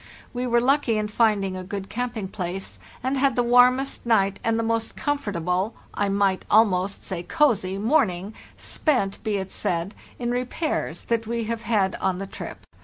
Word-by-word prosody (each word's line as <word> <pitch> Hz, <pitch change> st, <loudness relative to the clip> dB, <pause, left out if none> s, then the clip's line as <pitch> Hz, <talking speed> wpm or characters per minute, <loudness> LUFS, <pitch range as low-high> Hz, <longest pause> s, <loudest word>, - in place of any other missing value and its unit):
We 250 Hz, 0 st, -2 dB
were 240 Hz, 0 st, +4 dB
lucky 255 Hz, -2 st, +2 dB
in 210 Hz, 0 st, -1 dB
finding 210 Hz, -4 st, +2 dB
a 185 Hz, -, -5 dB
good 195 Hz, +1 st, -5 dB
camping 240 Hz, -4 st, -3 dB
place, 185 Hz, 0 st, -5 dB, 0.2 s
and 265 Hz, +1 st, 0 dB
had 270 Hz, -2 st, +3 dB
the 245 Hz, -, +2 dB
warmest 250 Hz, +3 st, +4 dB
night 200 Hz, -4 st, +2 dB
and 225 Hz, 0 st, +1 dB
the 230 Hz, -, 0 dB
most 225 Hz, 0 st, -1 dB
comfortable 200 Hz, -, -1 dB, 0.2 s
(I 205 Hz, -1 st, 0 dB
might 195 Hz, -1 st, +1 dB
almost 200 Hz, -3 st, +3 dB
say 185 Hz, -3 st, -3 dB
cozy) 200 Hz, -, +1 dB
morn 235 Hz, +3 st, +3 dB
ing—spent, 195 Hz, -, -3 dB
be 210 Hz, -2 st, 0 dB
it 190 Hz, -1 st, -4 dB
said, 175 Hz, +3 st, -2 dB, 0.2 s
in 240 Hz, -1 st, -2 dB
repairs—that 245 Hz, -3 st, -2 dB
we 235 Hz, 0 st, -1 dB
have 230 Hz, +1 st, -3 dB
had 210 Hz, -4 st, +1 dB
on 185 Hz, -1 st, +1 dB
the 195 Hz, -, -4 dB
trip. 195 Hz, -, -8 dB
220 Hz, 170 wpm, -24 LUFS, 195-245 Hz, 0.2 s, were